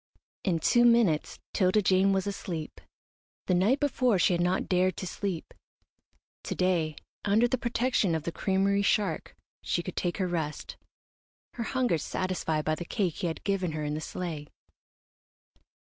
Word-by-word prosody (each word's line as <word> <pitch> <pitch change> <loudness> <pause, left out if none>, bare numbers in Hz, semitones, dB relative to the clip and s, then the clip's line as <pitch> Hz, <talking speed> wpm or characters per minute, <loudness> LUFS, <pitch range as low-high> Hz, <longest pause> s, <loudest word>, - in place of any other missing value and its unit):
In 180 -4 +1
two 240 +9 +3
minutes 230 -10 +3 0.2
'Tilda 195 +1 +3
Jane 190 +1 +4
was 190 -1 +1
asleep. 175 -5 -5 0.6
The - - +1
night 205 +10 +3
before 255 -6 +2
she 180 - +3
had 175 - +1
not 180 +2 +1
dared 185 0 +2
to - - -4
sleep. 185 -2 -4 0.9
To - - -3
day, 170 -4 +1 0.3
under 215 +4 +3
the 255 +1 -1
protection 240 -7 +1
of 160 - -2
the 170 - -3
creamery 195 +2 +1
shark, 200 -4 0 0.3
she 175 - -1
could 185 - -6
take 175 -1 -1
her 185 - 0
rest, 160 -4 -3 0.8
her 235 - -4
hunger 245 -11 +1
satisfied 160 -3 -2
by 155 - +1
the 155 - -3
cake 180 -1 -1
he 180 - -1
had 165 - -5
given 190 -5 -1
her 155 -1 -3
in 150 0 -2
the 155 - -3
sleigh. 160 -4 -5
185 Hz, 165 wpm, -29 LUFS, 165-205 Hz, 0.9 s, Jane